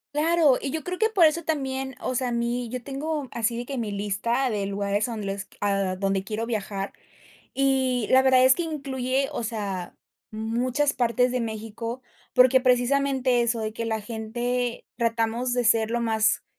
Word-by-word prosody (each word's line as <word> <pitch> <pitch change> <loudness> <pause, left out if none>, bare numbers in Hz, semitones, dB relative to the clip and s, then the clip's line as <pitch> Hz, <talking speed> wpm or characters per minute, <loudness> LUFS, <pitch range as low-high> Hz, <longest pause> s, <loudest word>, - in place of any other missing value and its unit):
Claro, 315 -3 +4
y 275 - -2
yo 315 +2 -3
creo 360 +3 -4
que 445 - +3
por 385 -6 +5
eso 315 +2 +2
también, 265 -4 -2
o - - -2
sea, 255 0 0
a 245 - -2
mí, 235 0 -1
yo 250 +1 -5
tengo 285 +2 -3
así 235 0 -1
de 240 - -4
que 270 -1 -4
mi 215 -3 -3
lista 215 +6 -1
de 200 -2 -1
lugares 200 +2 -1
a - - -3
donde 215 -2 -5
les 195 -1 -4
a 195 -2 0
donde 195 0 0
quiero 220 +2 -3
viajar, 200 -3 -3 0.6
y 260 -3 +1
la 260 - +7
verdad 260 -1 +5
es 260 - +7
que - - -2
incluye, 270 -4 -2
o - - -3
sea, 200 -5 -4 0.4
muchas 245 +6 0
partes 245 +1 +2
de 250 -1 0
México, 230 +2 -5 0.3
porque, 255 +1 +6
precisamente 255 0 +2
eso, 230 -1 0
de 215 0 -3
que 230 +1 -4
la 220 -1 -1
gente 240 +3 -3
tratamos 230 +1 0
de 245 - +1
ser 225 -1 +3
lo 240 - 0
más 220 -1 +2
240 Hz, 190 wpm, -25 LUFS, 220-265 Hz, 0.6 s, la